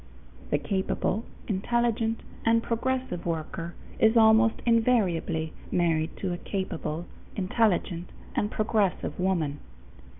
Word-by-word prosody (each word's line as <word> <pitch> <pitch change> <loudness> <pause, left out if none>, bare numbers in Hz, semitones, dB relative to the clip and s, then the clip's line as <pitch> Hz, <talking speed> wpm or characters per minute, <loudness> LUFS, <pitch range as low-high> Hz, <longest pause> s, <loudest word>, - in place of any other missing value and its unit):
The - - +3
capable, 195 +2 -1 0.2
intelligent, 230 +2 0 0.2
and 230 0 +3
progressive 245 -6 -1
worker 165 0 -3 0.2
is 220 +1 +5
almost 220 +1 +6
invariably 195 -9 +2 0.2
married 165 -2 +1
to 185 -2 -2
a 175 - -5
capable, 175 -4 -3 0.3
intelligent, 185 -3 +1 0.3
and 210 -5 +1
progressive 215 -5 0
woman. 170 -6 0
200 Hz, 100 wpm, -28 LUFS, 170-230 Hz, 0.3 s, almost